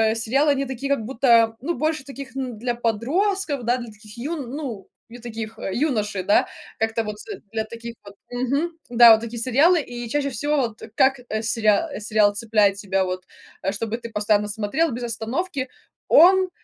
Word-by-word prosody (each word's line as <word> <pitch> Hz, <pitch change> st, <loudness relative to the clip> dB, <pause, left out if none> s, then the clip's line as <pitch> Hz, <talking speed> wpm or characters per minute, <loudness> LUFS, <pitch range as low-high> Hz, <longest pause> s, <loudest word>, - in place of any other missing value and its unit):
сериалы, 270 Hz, +7 st, +2 dB
они 275 Hz, 0 st, 0 dB
такие 270 Hz, +2 st, -2 dB
как 225 Hz, -, -2 dB
будто, 230 Hz, -3 st, +3 dB
ну, 340 Hz, +5 st, -1 dB
больше 310 Hz, -2 st, -1 dB
таких, 275 Hz, -1 st, -9 dB
н 255 Hz, -4 st, -4 dB
для 240 Hz, +1 st, -2 dB
подростков, 285 Hz, -, 0 dB
да, 245 Hz, +2 st, +1 dB
для 235 Hz, -3 st, -8 dB
таких 215 Hz, +1 st, -15 dB
юн 275 Hz, -1 st, -4 dB
ну, 255 Hz, -10 st, -6 dB, 0.2 s
не 240 Hz, -, -10 dB
таких, 225 Hz, -1 st, -7 dB
э, 195 Hz, -, -4 dB
юношей, 215 Hz, -9 st, 0 dB
да, 205 Hz, -, +3 dB, 0.3 s
как-то 225 Hz, 0 st, 0 dB
вот 210 Hz, -1 st, -5 dB, 0.3 s
для 220 Hz, -1 st, -2 dB
таких 230 Hz, +1 st, -8 dB
вот, 200 Hz, 0 st, -12 dB, 0.2 s
мгм, 275 Hz, +7 st, -1 dB, 0.2 s
да, 235 Hz, -1 st, +8 dB
вот 220 Hz, -, +7 dB
такие 230 Hz, 0 st, -6 dB
сериалы. 295 Hz, +8 st, +4 dB
И 240 Hz, -2 st, -7 dB
чаще 285 Hz, +1 st, 0 dB
всего 290 Hz, +5 st, -1 dB
вот 230 Hz, -5 st, -2 dB
как, 270 Hz, -2 st, +3 dB
э, 220 Hz, -1 st, -2 dB
сериа 220 Hz, +6 st, +1 dB
сериал 210 Hz, -1 st, +2 dB
цепляет 210 Hz, -2 st, +2 dB
тебя 195 Hz, -1 st, 0 dB
вот, 185 Hz, 0 st, -4 dB, 0.4 s
э, 195 Hz, -, -1 dB
чтобы 225 Hz, +2 st, -3 dB
ты 235 Hz, -1 st, -8 dB
постоянно 210 Hz, -1 st, +1 dB
смотрел 220 Hz, +10 st, 0 dB
без 240 Hz, +1 st, -5 dB
остановки: 255 Hz, -, -3 dB, 0.4 s
он 370 Hz, +3 st, +6 dB
235 Hz, 180 wpm, -23 LUFS, 220-275 Hz, 0.4 s, да